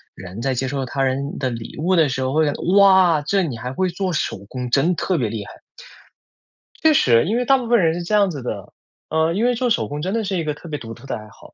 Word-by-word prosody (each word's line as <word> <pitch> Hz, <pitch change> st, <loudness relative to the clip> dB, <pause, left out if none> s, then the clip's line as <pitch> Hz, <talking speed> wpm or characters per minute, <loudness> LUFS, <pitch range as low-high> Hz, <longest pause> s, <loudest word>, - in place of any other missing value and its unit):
人 95 Hz, +4 st, -9 dB
在 130 Hz, +1 st, -1 dB
接 130 Hz, +2 st, -1 dB
受 135 Hz, 0 st, -3 dB
他 135 Hz, +2 st, -2 dB
人 135 Hz, +2 st, -2 dB
的 130 Hz, -2 st, 0 dB
礼 115 Hz, -1 st, -7 dB
物 180 Hz, +4 st, +1 dB
的 160 Hz, -4 st, +4 dB
时 130 Hz, 0 st, -2 dB
候， 130 Hz, +1 st, -1 dB
会 155 Hz, +1 st, +3 dB
觉 145 Hz, -, +1 dB
得： -, -, -8 dB, 0.2 s
“哇， 190 Hz, -5 st, +6 dB
这 185 Hz, +6 st, +1 dB
你 140 Hz, -8 st, -3 dB
还 125 Hz, +3 st, -5 dB
会 185 Hz, +6 st, 0 dB
做 185 Hz, +1 st, -2 dB
手 155 Hz, -, -2 dB
工， 125 Hz, -1 st, -5 dB
真 150 Hz, +8 st, +3 dB
特 185 Hz, -3 st, 0 dB
别 115 Hz, -6 st, -1 dB
厉 105 Hz, -2 st, -5 dB
害！“ -, -, -11 dB, 1.3 s
确 315 Hz, -1 st, +5 dB
实。 115 Hz, -, +4 dB
因 220 Hz, +6 st, 0 dB
为 250 Hz, -, 0 dB
大 270 Hz, +2 st, +5 dB
部 245 Hz, -3 st, -5 dB
分 235 Hz, 0 st, +4 dB
人 165 Hz, -3 st, +2 dB
是 175 Hz, -, -4 dB
这 175 Hz, -, -4 dB
样 200 Hz, -2 st, +4 dB
子 145 Hz, -6 st, -6 dB
的。 105 Hz, -6 st, -6 dB, 0.4 s
呃， 160 Hz, +1 st, +1 dB
因 210 Hz, +6 st, -1 dB
为 245 Hz, 0 st, +2 dB
做 250 Hz, +1 st, 0 dB
手 225 Hz, -, 0 dB
工 145 Hz, +1 st, -5 dB
真 185 Hz, +5 st, -2 dB
的 225 Hz, 0 st, 0 dB
是 195 Hz, -2 st, -2 dB
一 165 Hz, -, -1 dB
个 150 Hz, -, -1 dB
特 165 Hz, +3 st, -12 dB
别 150 Hz, -1 st, -4 dB
独 115 Hz, -1 st, -8 dB
特 125 Hz, +4 st, -14 dB
的 -, -, -3 dB
爱 110 Hz, -, -11 dB
好。 105 Hz, -, -17 dB
155 Hz, 305 characters per minute, -21 LUFS, 130-190 Hz, 1.3 s, 哇